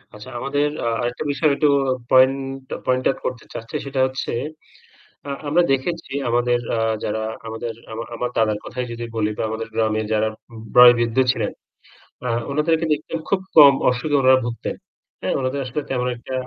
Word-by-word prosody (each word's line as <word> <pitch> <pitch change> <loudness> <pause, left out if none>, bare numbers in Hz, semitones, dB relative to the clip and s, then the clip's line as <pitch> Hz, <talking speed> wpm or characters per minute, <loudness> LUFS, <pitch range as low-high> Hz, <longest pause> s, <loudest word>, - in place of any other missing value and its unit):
আচ্ছা 105 +4 -10
আমাদের 145 +3 0 0.2
আ - - +1
আরেকটা 120 +1 -2
বিষয় 150 +2 +2
একটু 150 - +2 0.4
পয়েন্ট, 130 +1 +5 0.4
পয়েন্ট 130 0 +1
আউট 135 - -1
করতে 125 -2 -4
চাচ্ছি 115 - -7
সেটা 135 -1 -3
হচ্ছে 130 +1 -4 1.0
আ 140 - -5 0.2
আমরা 170 +5 +4
দেখেছি 135 +2 -2 0.2
আমাদের 120 +1 +2 0.2
আ - - 0 0.3
যারা 110 +1 -1 0.3
আমাদের 115 +1 -4 0.2
আমার 115 +1 -5
আমার 125 +1 -2
দাদার 110 -2 +2
কথাই 125 0 -4
যদি 120 0 -5
বলি 110 -1 +1
দা - - -2
আমাদের 110 0 -4
গ্রামে 110 -1 +1
যারা 110 0 +2 0.5
বয়োবৃদ্ধ 120 -2 +7 0.2
ছিলেন। - - -2 0.7
আ - - -1 0.2
উনাদেরকে 160 +3 +1
দেখতে 150 +2 -6 0.2
খুব 195 -1 +1
কম 145 -3 +10 0.2
অসুখে 125 +4 -1
উনারা 130 0 +6
ভুগতেন। 120 -1 -4 0.5
হ্যাঁ? - - -1
উনাদের 130 +1 -1
আসলে 125 +4 -3
তেমন 125 -1 -1
একটা 120 +2 -9
125 Hz, 165 wpm, -21 LUFS, 115-140 Hz, 1.0 s, কম